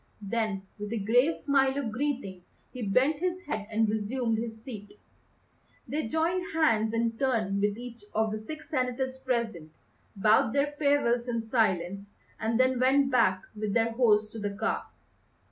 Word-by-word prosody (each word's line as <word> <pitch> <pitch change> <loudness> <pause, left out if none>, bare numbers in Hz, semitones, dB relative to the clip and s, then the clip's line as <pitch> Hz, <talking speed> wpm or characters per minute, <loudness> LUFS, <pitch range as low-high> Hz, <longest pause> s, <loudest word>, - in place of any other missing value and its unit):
Then, 210 -2 -1 0.2
with 210 0 -5
a - - -1
grave 245 +10 +3
smile 270 -1 +2
of 260 -6 -2
greeting, 245 -7 -3 0.3
he 250 - -7
bent 255 +9 +2
his 365 +1 -2
head 215 -8 -3
and 220 0 +2
resumed 220 +2 -1
his 225 -1 -5
seat. 210 -4 -9 0.9
They 300 -5 -2
joined 345 - -1
hands 225 -9 +3
in 230 0 -1
turn 220 -7 +1
with 205 0 +1
each 240 -2 -9
of 220 0 +1
the 215 - -3
six 310 +8 -8
senators 260 -1 -1
present, 235 -11 -2 0.4
bowed 215 +2 +4
their 285 +1 +1
farewells 270 -5 +2
in 230 -2 -2
silence, 200 -3 0 0.3
and 225 +2 0
then 255 -1 +3
went 270 +2 +3
back 190 -7 +3
with 210 -1 -2
their 230 0 +2
host 215 -3 +3
to 225 - -7
the 205 -1 -2
car. - - -2
230 Hz, 160 wpm, -29 LUFS, 215-265 Hz, 0.9 s, bowed